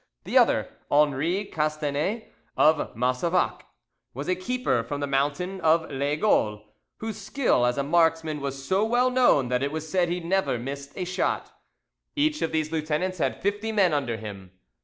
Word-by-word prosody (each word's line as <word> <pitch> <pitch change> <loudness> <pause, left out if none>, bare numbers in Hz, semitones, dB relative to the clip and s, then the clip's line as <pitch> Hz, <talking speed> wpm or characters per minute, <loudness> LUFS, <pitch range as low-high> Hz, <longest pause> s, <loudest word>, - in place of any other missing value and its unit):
The - - -5
other, - - +4 0.2
Henri 150 +7 +2
Castanet 155 +6 -2 0.2
of 155 -1 +3
Massevaques, 130 +9 0 0.5
was 140 +3 -5
a 185 - +2
keeper 210 - -1
from 145 +5 -4
the 145 - -1
mountain 145 +8 -1
of 160 0 +2
Laygoal, 140 - +1 0.3
whose 220 0 -5
skill 205 - +1
as 125 - 0
a 140 - +1
marksman 160 -1 +1
was 135 0 -5
so 190 +2 +2
well 245 +3 +2
known 245 - +3
that 125 0 0
it 140 +1 -1
was 160 0 -4
said 175 +1 +1
he 175 +1 -1
never 180 -5 0
missed 140 +3 -6
a 185 - -2
shot. 180 +1 -1 0.6
Each 305 +1 +1
of 165 - 0
these 155 -1 -1
lieutenants 160 +4 -1
had - - -1
fifty 205 +3 -1
men 195 -6 +3
under 125 -6 -1
him. 100 -4 -9
155 Hz, 165 wpm, -26 LUFS, 140-185 Hz, 0.6 s, other